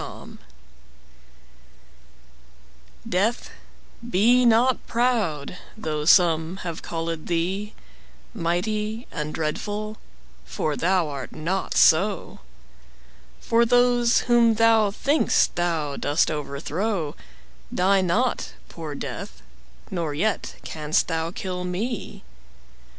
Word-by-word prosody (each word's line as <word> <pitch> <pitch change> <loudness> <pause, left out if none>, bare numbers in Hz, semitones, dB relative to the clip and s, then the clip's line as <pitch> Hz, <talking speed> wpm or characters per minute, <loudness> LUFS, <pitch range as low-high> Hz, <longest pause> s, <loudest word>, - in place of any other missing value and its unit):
Death - - -9 2.8
DEATH, 210 +7 0 0.6
be 240 +5 +4
not 235 +3 +3
proud, 210 - 0 0.2
though 155 -7 -3
some 170 0 +4
have 170 -2 -5
callèd 165 -1 -4
thee 185 +5 -2 0.6
Mighty 210 +5 -2
and 150 0 -4
dreadful, 205 +8 -3 0.5
for 145 - -2
thou 180 0 +1
art 140 -3 -6
not 180 +5 -2
so: 190 +4 +3 1.0
For 230 +1 +2
those 245 0 +3
whom 235 -2 +4
thou 225 -1 +4
think'st 280 +9 +2
thou 165 -5 -1
dost 145 +3 +1
overthrow 155 +4 -3 0.6
Die 190 +2 +3
not, 215 +8 0 0.2
poor 155 -3 -7
Death; 70 - -7 0.5
nor 165 -5 -2
yet 210 +7 -1
canst 155 +1 -1
thou 165 -1 -1
kill 180 0 -5
me. 195 - -4
180 Hz, 95 wpm, -24 LUFS, 160-220 Hz, 2.8 s, be